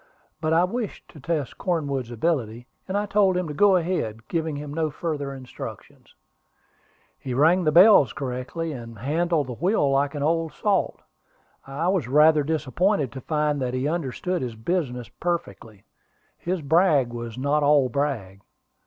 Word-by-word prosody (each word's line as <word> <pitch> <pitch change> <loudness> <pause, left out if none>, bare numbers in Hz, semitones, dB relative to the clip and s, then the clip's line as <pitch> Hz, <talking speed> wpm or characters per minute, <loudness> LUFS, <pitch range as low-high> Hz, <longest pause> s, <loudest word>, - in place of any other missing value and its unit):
But 155 -1 0
I 165 +2 +4
wished 215 +3 -4
to 155 - -14
test 150 -2 -3
Cornwood's 140 -9 -2
ability, 120 -3 -2 0.2
and 195 +1 -1
I 205 - 0
told 195 -2 +2
him 180 -2 -1
to 150 - -5
go 195 +5 +4
ahead, 135 -12 -2
giving 160 -2 -2
him 145 0 -6
no 160 0 0
further 145 -3 -4
instructions. 130 -2 -10 1.0
He 130 -2 -5
rang 165 +7 +4
the 155 - +3
bells 175 - +7
correctly, 135 +5 -4
and 115 -5 -8
handled 155 +5 0
the 125 - -6
wheel 165 - +1
like 140 +1 +1
an 145 - -2
old 165 0 0
salt. 200 +4 -1 0.6
I 140 +5 -2
was 185 -10 0
rather 150 +3 +5
disappointed 155 - 0
to 135 - -8
find 150 -1 -1
that 125 0 -2
he 130 +2 -1
understood 170 +3 -2
his 120 -3 -4
business 125 -2 -2
perfectly. 110 - -5 0.5
His 175 -2 -3
brag 150 -5 +3
was 120 -1 -6
not 140 +3 +1
all 145 -2 +4
brag. 125 -9 -3
150 Hz, 160 wpm, -24 LUFS, 130-170 Hz, 1.0 s, bells